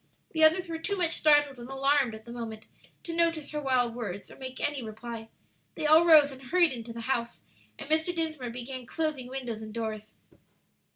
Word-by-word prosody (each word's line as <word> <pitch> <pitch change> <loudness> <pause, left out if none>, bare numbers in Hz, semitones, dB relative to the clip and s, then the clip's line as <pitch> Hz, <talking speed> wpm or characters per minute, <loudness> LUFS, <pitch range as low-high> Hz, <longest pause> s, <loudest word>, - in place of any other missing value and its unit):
The 315 -1 +1
others 355 +4 +5
were 325 -1 -4
too 400 +4 -2
much 345 -3 +1
startled 290 -4 +4
and 240 +1 -9
alarmed 270 -3 +2
at 220 - -13
the 235 - -9
moment 225 -2 -6 0.4
to 335 - -5
notice 330 -3 +1
her 300 -1 -3
wild 255 -4 +1
words 205 -5 -6
or - - -11
make 260 -1 -8
any 290 -2 -1
reply. 225 0 -7 0.5
They - - -3
all 315 +3 +7
rose 300 -3 +8
and 265 0 -11
hurried 340 +6 +3
into 235 -2 -7
the 230 0 -6
house, 235 -1 -2 0.4
and - - -8
Mr. 315 +3 +1
Dinsmore 315 -6 -3
began 250 +1 -7
closing 310 -6 -2
windows 250 -4 -5
and 215 0 -8
doors. 215 -1 -4
265 Hz, 195 wpm, -29 LUFS, 235-310 Hz, 0.5 s, rose